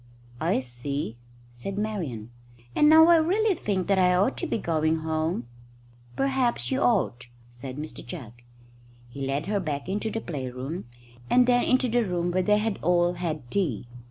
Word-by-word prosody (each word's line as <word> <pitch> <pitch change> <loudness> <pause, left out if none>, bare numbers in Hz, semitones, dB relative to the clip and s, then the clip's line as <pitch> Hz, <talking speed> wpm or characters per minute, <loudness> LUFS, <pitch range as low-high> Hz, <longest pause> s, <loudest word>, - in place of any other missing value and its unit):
"I - - +1
see," 125 0 -4 0.3
said 120 +12 -6
Marian; 165 - -3 0.4
"and 300 - +5
now 320 +1 +9
I 340 - +8
really 390 +7 +2
think 195 - -2
that 195 -1 +2
I 180 -1 +4
ought 190 +3 +2
to - - -3
be - - -1
going 160 -4 0
home." 160 -4 -1 0.7
"Perhaps 265 -3 0
you 265 +1 0
ought," 130 - +1 0.2
said 130 +2 -8
Mr 155 +1 -7
Jugg. 135 -12 -8 0.8
He 135 +2 -5
led 140 +3 -1
her 205 0 0
back 150 -5 -3
into 205 +3 -2
the 225 - -3
playroom, 135 - -5 0.4
and 250 0 +5
then 245 0 +3
into 255 0 +3
the 240 0 +2
room 175 -3 -1
where 185 +1 +1
they 210 +2 +3
had 215 -1 -1
all 175 +1 +3
had 155 -7 -4
tea. 150 - -1
175 Hz, 170 wpm, -26 LUFS, 140-220 Hz, 0.8 s, now